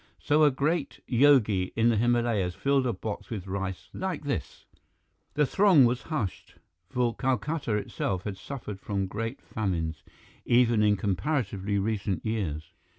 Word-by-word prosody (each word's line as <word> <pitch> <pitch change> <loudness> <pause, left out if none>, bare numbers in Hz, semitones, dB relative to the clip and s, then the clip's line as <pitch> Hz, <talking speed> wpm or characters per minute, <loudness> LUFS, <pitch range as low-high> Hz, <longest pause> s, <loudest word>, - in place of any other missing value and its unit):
So 150 +1 +2
a 150 - +7
great 140 +2 -1
yogi 115 -8 +4
in 115 +1 +3
the 115 - +3
Himalayas 115 -5 +1
fill 140 -2 +1
a - - +1
box 105 -3 -6
with 105 -6 -5
rice 95 -1 -4
like 185 -5 -3
this 95 - -4 0.3
" - - -45
The 150 0 +3
throng 185 -4 +5
was 120 +1 +1
hushed, 145 - -4 0.3
for 120 +1 0
Calcutta 135 -1 -1
itself 95 -2 -2
had 105 -2 -4
suffered 110 -5 -7
from 100 -1 -2
great 115 +6 -5
famines, 85 -7 -2 0.4
even 120 -2 +4
in 105 -1 +3
comparatively 100 - -1
recent 100 -3 -1
years. 90 -9 -3
110 Hz, 150 wpm, -28 LUFS, 95-135 Hz, 0.4 s, a